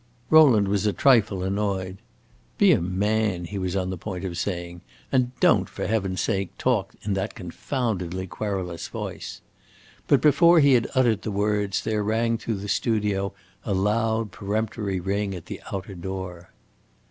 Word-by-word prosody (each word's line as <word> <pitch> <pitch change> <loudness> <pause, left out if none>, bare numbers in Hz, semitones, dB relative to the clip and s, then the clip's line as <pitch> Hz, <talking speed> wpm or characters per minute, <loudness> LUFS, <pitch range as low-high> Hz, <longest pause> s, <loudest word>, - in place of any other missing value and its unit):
Rowland 135 -11 +7
was 100 +1 +1
a 105 - +1
trifle 110 -8 +3
annoyed. 95 -1 -2 0.6
"Be - - +6
a - - +3
man," 95 0 0
he 100 +3 -5
was 95 0 -2
on 95 -1 -1
the 95 - -5
point 95 -1 -5
of 90 -2 -4
saying, 85 -1 -4 0.3
"and 125 -2 +2
don't, - - +4
for - - -5
heaven's 95 -4 -1
sake, 95 -1 -2
talk 110 -7 0
in 105 - -1
that 95 0 -3
confoundedly 95 -2 -3
querulous 95 -3 -4
voice." - - -6 0.7
But - - +5
before 170 +3 +6
he 140 -2 +5
had 120 -2 +3
uttered 120 -5 +3
the - - -4
words, 105 -1 0
there 105 -1 -1
rang 115 +2 0
through 115 - -2
the 100 +1 -6
studio 105 -3 0 0.3
a 100 - -1
loud, 110 +2 0
peremptory 105 -1 -2
ring 100 +2 -2
at 85 - -9
the - - -7
outer 95 +1 -5
door. 90 -1 -6
100 Hz, 160 wpm, -25 LUFS, 95-110 Hz, 0.7 s, Rowland